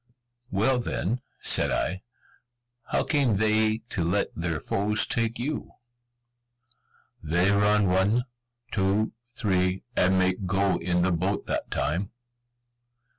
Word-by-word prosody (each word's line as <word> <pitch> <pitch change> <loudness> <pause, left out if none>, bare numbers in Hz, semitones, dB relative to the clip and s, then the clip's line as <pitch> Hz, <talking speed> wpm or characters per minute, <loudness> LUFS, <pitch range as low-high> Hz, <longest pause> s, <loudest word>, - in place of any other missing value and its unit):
"Well, 120 +6 +1
then," 120 0 -2 0.2
said - - +4
I, 95 0 -1 0.8
"How - - 0
came 135 -9 +1
they 110 +1 +2
to 90 - 0
let 90 +5 0
their 85 -2 -2
foes 105 +6 0
take 115 0 0
you?" 140 +5 -4 1.5
"They 90 +5 +2
run 105 0 +3
one, 95 +6 +2 0.5
two, 100 +2 +1 0.2
three, 95 -4 0
and 95 +1 +3
make 95 +1 +1
go 95 +1 +1
in 90 0 +1
the 95 - +2
boat 95 +4 -1
that - - -3
time." 90 +6 -1
100 Hz, 120 wpm, -26 LUFS, 90-110 Hz, 1.5 s, said